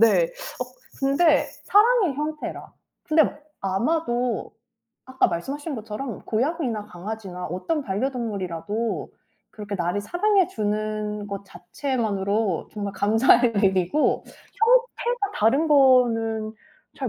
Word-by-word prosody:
네. 230 - +5
어 - - -6 0.4
근데 290 +3 +3 0.2
사랑의 420 - +4
형태라. 300 +2 -5 0.3
근데 315 0 +4 0.4
아마도 240 +3 -1 0.5
아까 260 0 +2
말씀하신 280 - -4
것처럼 220 +3 -6
고양이나 245 -3 -1
강아지나 190 -1 -6
어떤 280 - -2
반려동물이라도 210 -2 -3 0.4
그렇게 205 -1 -6
나를 175 +2 -1
사랑해 370 - +2
주는 210 0 -2
것 200 -1 -6
자체만으로 205 - -2
정말 205 -2 -4
감사할 225 +1 +3
일이고 190 - +2
형태가 480 -2 0
다른 275 +9 +3
거는 230 -6 +4 0.5
잘 260 -3 -2
230 Hz, 255 characters per minute, -24 LUFS, 205-300 Hz, 0.5 s, 네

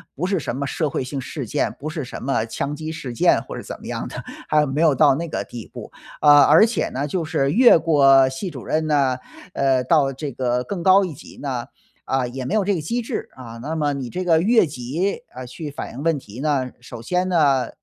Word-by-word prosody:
不 160 - -2
是 190 0 0
什 135 - -4
么 140 +1 -3
社 155 +2 -1
会 135 - -2
性 135 +2 -5
事 135 +1 -5
件， - - -1
不 155 - -5
是 155 -3 -4
什 - - -8
么 130 -4 0
枪 140 +5 -4
击 155 +1 -6
事 160 -6 -6
件 115 - +3
或 - - -8
者 - - -6
怎 - - -8
么 - - -12
样 - - -4
的， - - -7 0.2
还 150 -1 +3
没 140 +2 -2
有 155 -4 +4
到 130 - +5
那 170 +4 -4
个 155 - -3
地 120 -3 -9
步。 - - -10 0.3
啊， 145 -1 +8
而 155 +9 +7
且 225 -6 -1
呢， 135 +3 -3
就 165 +3 -2
是 150 -4 0
越 240 - +7
过 135 -5 +5
系 135 +8 -5
主 135 -6 -9
任 155 0 0
呢， 140 -4 +2 0.4
呃， 135 -2 +2
到 135 0 +2
这 140 +2 -5
个 125 0 -1
更 190 +5 -5
高 190 +3 +5
一 180 -4 -4
级 145 - -14
呢， 130 -4 -3 0.4
啊， 130 -1 0
也 130 +1 -6
没 130 - -3
有 215 -2 +2
这 200 +1 +1
个 170 - -2
机 235 +11 -2
制。 230 - -4
啊， 115 -3 -10
那 155 +4 -4
么 150 -2 0
你 135 -3 -4
这 185 +9 -4
个 165 -2 +3
越 225 +3 +4
级， 150 +7 -3
呃， 130 0 -7
去 150 +5 -7
反 145 - -7
映 130 - -7
问 165 0 +1
题 115 -3 -11
呢， 135 -3 0
首 120 -1 -10
先 180 +9 -1
呢， 140 -8 +2
145 Hz, 265 characters per minute, -22 LUFS, 130-165 Hz, 0.4 s, 啊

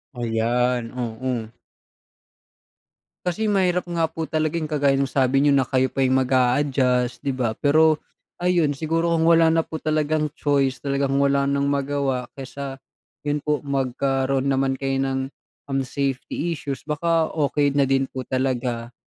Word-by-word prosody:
Ayan, 120 +1 0
oo. 120 0 -3 1.8
Kasi 210 +5 0
mahirap 180 -3 +1
nga 170 -1 +1
po 160 0 -5
talaga 155 +1 0
yung 155 - -4
kagaya 145 -2 +2
nung 135 -1 0
sabi 135 0 +2
niyo 145 0 +4
na 135 -1 +3
kayo 130 +1 +1
pa 135 +1 0
yung 130 +1 +3
mag-a-adjust, 130 -1 +1
'di 140 - 0
ba? 120 -4 -2
Pero 155 +2 +4 0.4
ayun, 175 -5 +1
siguro 165 +2 0
kung 160 - +2
wala 165 -1 +5
na 165 0 +2
po 160 - -6
talagang 155 0 0
choice, 140 -3 +1
talagang 140 -1 -1
wala 140 0 +2
nang 140 0 +1
magawa, 140 -3 -1
kaysa 135 +1 -6 0.5
'yon 145 0 0
po, 150 0 0
magkaroon 135 0 0
naman 135 -1 +1
kayo 135 0 -1
ng, 135 0 -1 0.5
um, 135 -1 -1
safety 140 +5 -2
issues, 140 -4 -6
baka 160 +2 +1
okey 145 -2 +1
na 140 0 +3
din 135 0 +2
po 130 - -6
talaga 125 -2 -2
140 Hz, 150 wpm, -23 LUFS, 130-150 Hz, 1.8 s, wala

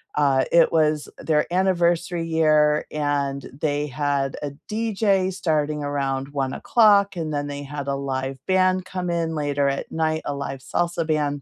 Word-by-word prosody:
uh, 140 -3 +3
it 170 -1 +5
was, 155 -2 +2
eh, - - -10
their 150 -2 +2
anniversary 175 -2 +1
year 155 -2 +3
and 140 -2 -2
they 145 -1 0
had 140 -1 -1
a 145 -1 -4
DJ 205 -4 +1
starting 155 -5 -1
around 135 -1 -2
01:00, 200 - +3
and 160 -2 -3
then 145 -1 -2
they 145 0 -5
had 145 0 -6
a 140 - 0
live 135 -1 -3
band 185 0 +2
come 180 -1 -3
in 165 -1 -1
later 145 -1 0
at 140 - -4
night, 160 0 -1
a 145 - -2
live 140 -1 -5
salsa 170 +4 -1
band. 145 -2 0
150 Hz, 165 wpm, -23 LUFS, 140-170 Hz, -, it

